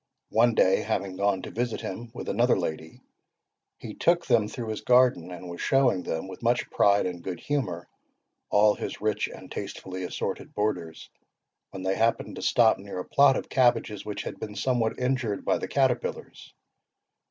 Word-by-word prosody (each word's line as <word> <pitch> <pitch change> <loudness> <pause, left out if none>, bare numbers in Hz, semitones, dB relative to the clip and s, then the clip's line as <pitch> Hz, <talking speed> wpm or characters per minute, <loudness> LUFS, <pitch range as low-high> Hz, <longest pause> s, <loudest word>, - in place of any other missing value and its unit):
One 115 0 +4
day, 95 +1 +4
having 100 -3 -2
gone 100 -1 0
to - - -7
visit 120 0 -2
him 115 +5 -6
with - - -8
another - - +2
lady, 80 +1 -5 0.8
he - - -8
took 170 0 +2
them 115 -4 +3
through 115 0 -6
his 110 - -4
garden, 125 -8 +4
and 90 0 -8
was 85 0 -7
showing 135 -8 +3
them, 80 +1 -4
with 95 - -10
much 120 +1 0
pride 100 0 +3
and 90 -1 -4
good 90 0 -5
humour, 105 -13 -2 0.6
all 105 0 +5
his - - -6
rich 105 -1 0
and - - -12
tastefully 95 0 -6
assorted 90 - -4
borders, 90 -6 -3 0.6
when 95 -1 -8
they 95 0 +1
happened 115 +3 0
to - - -6
stop 115 -4 +4
near 100 -1 -8
a 90 - -4
plot 140 -1 +5
of - - -5
cabbages 120 -5 +2
which 105 - -5
had - - -7
been 105 -1 -6
somewhat 120 -2 0
injured 125 -5 -1
by - - +2
the - - -4
caterpillars. - - -1
105 Hz, 175 wpm, -27 LUFS, 95-120 Hz, 0.8 s, all